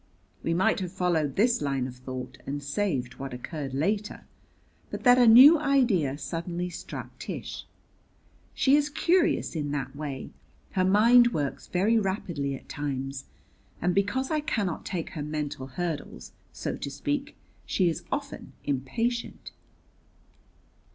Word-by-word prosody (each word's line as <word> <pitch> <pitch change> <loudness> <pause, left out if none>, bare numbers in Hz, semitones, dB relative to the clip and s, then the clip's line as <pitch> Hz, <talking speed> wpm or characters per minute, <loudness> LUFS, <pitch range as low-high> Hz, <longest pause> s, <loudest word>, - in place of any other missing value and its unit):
We 165 - 0
might 185 +3 +2
have 180 -2 -4
followed 170 -7 0
this 235 +3 +3
line 135 -3 0
of 125 -1 -7
thought, 130 0 -7
and 145 +1 -3
saved 140 -5 -2
what 135 -2 -5
occurred 135 +1 -5
later, 200 +8 -1 0.6
but - - -6
that 245 0 +7
a 245 - +6
new 270 +8 +10
idea 240 - +2
suddenly 170 +5 -4
struck - - -8
Tish. - - -6 0.9
She 270 +1 +4
is 295 0 +2
curious 335 - +2
in 150 -2 -2
that 135 -1 -3
way; 140 -3 -5 0.4
her 185 - +1
mind 235 +5 +6
works 145 -3 -3
very 210 +6 +2
rapidly 175 -8 -2
at - - -12
times, 135 -2 -4 0.5
and 180 +1 +1
because 205 - 0
I 310 - +2
cannot 210 - -2
take 175 -4 -3
her 155 - -5
mental 150 -2 -4
hurdles, 155 +3 -5 0.2
so - - -4
to - - -5
speak, 280 - -3 0.3
she 185 - +2
is 165 - -1
often 280 0 -4
impatient. 145 - -2
170 Hz, 140 wpm, -27 LUFS, 140-230 Hz, 0.9 s, new